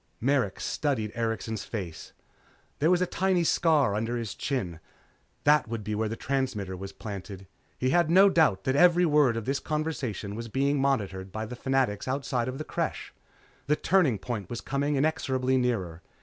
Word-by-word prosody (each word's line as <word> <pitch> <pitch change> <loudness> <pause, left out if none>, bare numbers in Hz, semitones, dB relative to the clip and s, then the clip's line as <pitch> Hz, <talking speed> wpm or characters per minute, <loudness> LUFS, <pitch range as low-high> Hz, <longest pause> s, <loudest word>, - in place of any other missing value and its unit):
Merrick 125 -6 +1
studied 125 -8 -1
Erikson's 115 -1 -2
face. 90 -8 -6 0.7
There 155 - +3
was 180 0 +4
a - - +2
tiny 185 0 +1
scar 155 -9 +3
under 115 +3 -1
his 115 -4 -4
chin. 95 - -3 0.6
That 150 -3 +4
would 115 -1 -4
be 105 +1 -3
where 110 +1 -1
the 115 - -3
transmitter 115 -9 -2
was 95 +1 -7
planted. 100 -2 -8 0.3
He 130 0 0
had 170 0 +3
no 190 +4 +7
doubt 150 - +3
that 130 - 0
every 175 +3 +5
word 145 -7 +3
of 115 - -4
this 135 +1 0
conversation 145 - -3
was 115 +2 -5
being 140 +4 +1
monitored 100 -9 -1
by 110 +2 -4
the 125 +3 -7
Fanatics 130 -5 0
outside 130 -2 -1
the 155 - -4
Creche. - - -3 0.5
The 150 - +3
turning 160 - +2
point 105 -1 -5
was 120 - -4
coming 140 +2 -1
inexorably 130 -3 +1
nearer. 95 -10 -1
125 Hz, 170 wpm, -28 LUFS, 105-145 Hz, 0.7 s, no